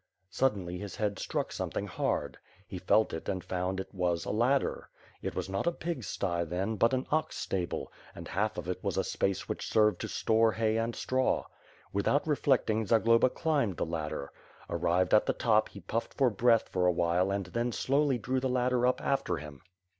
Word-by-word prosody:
Suddenly, 100 -7 0
his 100 -3 -6
head 105 -2 -1
struck - - -2
something - - -3
hard. - - -2 0.3
He 90 - -6
felt 110 +4 +3
it 80 - -5
and 95 -2 -2
found 90 +1 -2
it 95 - -7
was 90 -3 0
a - - -2
ladder. 125 +6 +1 0.3
This - - -4
was - - -2
not 95 - -2
a - - +4
pig's 165 - -4
sty, 85 -3 -1
then, 95 +6 -2
but 115 +5 +3
an 130 - -2
ox 155 0 0
stable, 90 -3 -3 0.2
and - - -8
half 105 +4 -1
of 90 -1 -5
it 90 0 -4
was - - -1
a - - +2
space 95 -1 -1
which - - -4
served 105 -1 +3
to - - -3
store 110 0 +2
hay 110 -1 +1
and 115 +1 -1
straw. 130 0 0 0.5
Without 100 +9 +1
reflecting 130 -7 +2
Zagloba 115 +3 +4
climbed 140 - 0
the - - 0
ladder. 75 -3 -4 0.4
Arrived 90 +2 +1
at 105 - +5
the - - +2
top 110 -2 +2
he 100 - -11
puffed 110 +6 -3
for 130 -4 +3
breath 115 0 +2
a - - 0
while 90 +2 +1
and 100 -1 -1
then 120 +6 -2
slowly 140 +2 +1
drew 130 +3 -1
the 130 0 -1
ladder 125 0 +2
up 125 - +1
after 135 -11 0
him. 75 -1 -9
105 Hz, 195 wpm, -30 LUFS, 90-125 Hz, 0.5 s, at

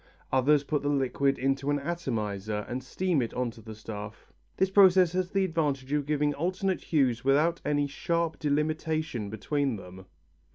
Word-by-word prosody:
Others 140 +3 +4
put 150 0 -1
the 145 - -1
liquid 135 0 +1
into 135 +1 0
an 145 - +2
atomizer 110 - -3
and 125 +2 -4
steam 175 +2 0
it 115 - -4
on 125 -1 -1
to 115 0 -14
the 110 -1 -9
stuff. 105 0 -9 0.2
This 190 0 +2
process 190 -3 +6
has 185 0 -1
the 195 -1 +1
advantage 145 -6 -1
of 145 -1 0
giving 150 -1 +1
alternate 185 +5 -1
hues 130 -7 +1
without 150 +5 +2
any 145 0 +1
sharp 170 +3 -2
delimitation 155 -5 -1
between 135 +5 -1
them. 95 -1 -11
145 Hz, 165 wpm, -28 LUFS, 125-160 Hz, 0.2 s, process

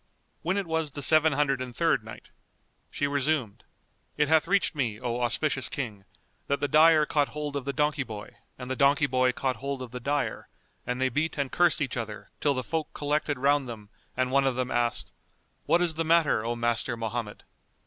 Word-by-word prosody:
When 180 +4 0
it 200 - -1
was 160 -2 -1
the 145 0 -5
Seven 155 +1 +5
Hundred 135 -2 +1
and 125 -2 -6
Third - - +2
Night, - - -11 0.6
She 145 - -2
resumed, 140 -5 -1 0.5
It 150 -1 +2
hath 160 0 +4
reached 200 0 +2
me, 120 -8 -2
O 125 -1 -3
auspicious 130 +2 +1
King, 105 -8 -5 0.4
that 140 - 0
the 145 - 0
dyer 155 +1 +6
caught 145 -1 +1
hold 150 -1 -5
of 140 -2 -3
the 140 - -1
donkey 150 +1 0
boy 110 -5 -7 0.3
and 125 - -7
the - - 0
donkey 140 +2 +4
boy 130 -1 +2
caught 130 0 -2
hold 140 0 -4
of 125 - -9
the 125 - -5
dyer 145 +3 -2 0.4
and 125 0 -2
they 130 0 +2
beat 150 +6 -1
and 140 -2 -2
cursed 175 -2 +2
each 130 -4 -2
other 110 -3 -6
till 145 -2 +1
the 130 - -2
folk 160 +3 -3
collected 145 -1 -1
round 140 0 +2
them 105 -3 -9 0.3
and 130 0 0
one 135 0 +3
of 130 - 0
them 125 0 -2
asked, 120 - -1 0.5
"What 175 +1 +4
is 170 -2 +1
the 165 +1 -1
matter, 160 -8 +3
O 120 +1 -2
Master 120 0 0
Mohammed?" 115 -1 -4
140 Hz, 205 wpm, -27 LUFS, 125-150 Hz, 0.6 s, dyer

